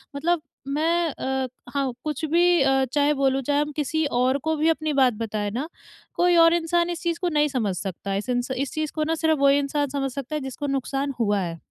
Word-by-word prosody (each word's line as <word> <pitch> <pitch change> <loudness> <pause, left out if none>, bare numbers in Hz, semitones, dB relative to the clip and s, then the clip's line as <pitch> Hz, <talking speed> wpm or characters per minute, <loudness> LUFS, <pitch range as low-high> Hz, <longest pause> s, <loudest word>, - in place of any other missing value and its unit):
मतलब 325 +3 0 0.3
मैं 330 +4 +1
अ, 265 -1 -2 0.3
हाँ, 275 -2 0
कुछ 305 0 -4
भी 345 -1 +4
अ, 270 0 +3
चाहे 290 0 +3
बोलूँ, 270 0 +2
चाहे 285 +2 +1
हम 295 - -2
किसी 310 +1 0
और 255 0 +1
को 320 - +2
भी 310 +2 +2
अपनी 310 -2 0
बात 260 -3 +4
बताएँ 210 -2 -2
ना, 260 +8 -3 0.5
कोई 350 0 +3
और 330 0 +7
इंसान 345 +1 +1
इस 345 -1 -4
चीज़ 340 -1 -1
को 355 - 0
नहीं 300 -1 +2
समझ 225 -9 -1
सकता 195 +1 -5
है, 195 - 0
इस 210 +5 -5
इन 245 0 +1
स 250 - -7
इस 280 - -6
चीज़ 310 -1 -2
को 310 - 0
ना 325 +1 0
सिर्फ़ 315 -2 +1
वही 280 0 +5
इंसान 285 +1 -1
समझ 275 -1 -2
सकता 275 +3 -5
है, 300 - -2
जिसको 265 +2 -5
नुकसान 275 +1 -2
हुआ 205 -3 +2
है। 170 -2 -4
285 Hz, 235 wpm, -24 LUFS, 265-315 Hz, 0.5 s, और